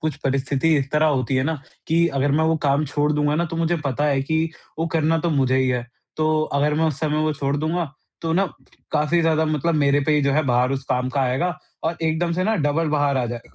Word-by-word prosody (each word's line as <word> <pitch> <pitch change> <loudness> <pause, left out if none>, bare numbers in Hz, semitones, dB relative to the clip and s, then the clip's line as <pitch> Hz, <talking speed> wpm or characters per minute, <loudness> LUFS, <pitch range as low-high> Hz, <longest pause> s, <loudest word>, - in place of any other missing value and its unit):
कुछ 155 -2 -2
परिस्थिति 135 +3 +1
इस 135 0 -3
तरह 155 +1 +3
होती 135 -3 0
है 130 - +2
ना 160 +2 0 0.3
कि 170 +1 +3
अगर 140 +1 +2
मैं 160 +2 +2
वो 160 0 +2
काम 140 +2 +2
छोड़ 145 +1 0
दूँगा 150 0 +1
ना 170 +3 +1
तो 165 - -4
मुझे 165 +1 +1
पता 140 +1 -1
है 140 -2 +2
कि 160 +3 0 0.3
वो 165 - 0
करना 165 0 +1
तो 170 +1 -1
मुझे 130 -3 +2
ही 130 -1 +2
है, 125 -1 -1 0.3
तो 155 0 +1
अगर 150 0 0
मैं 160 +2 +1
उस 155 -3 -1
समय 155 -1 0
वो 155 0 +1
छोड़ 140 -1 -1
दूँगा, 160 0 -2 0.3
तो 165 -1 -1
ना 195 +4 +2 0.5
काफ़ी 150 +3 +2
ज़्यादा 160 -1 +2
मतलब 155 +2 0
मेरे 145 -1 +3
पे 155 - +3
ही - - +3
जो 140 0 +2
है 155 +3 +2
भार 125 0 +2
उस 135 -1 -3
काम 125 0 0
का 140 +2 -1
आएगा 135 +8 0 0.3
और 165 +1 -1
एकदम 160 +2 0
से 185 +2 0
ना 220 - +2
डबल 155 +2 +1
भार 145 -2 +1
आ 130 - +1
जाए 120 0 -5
150 Hz, 250 wpm, -22 LUFS, 140-160 Hz, 0.5 s, तरह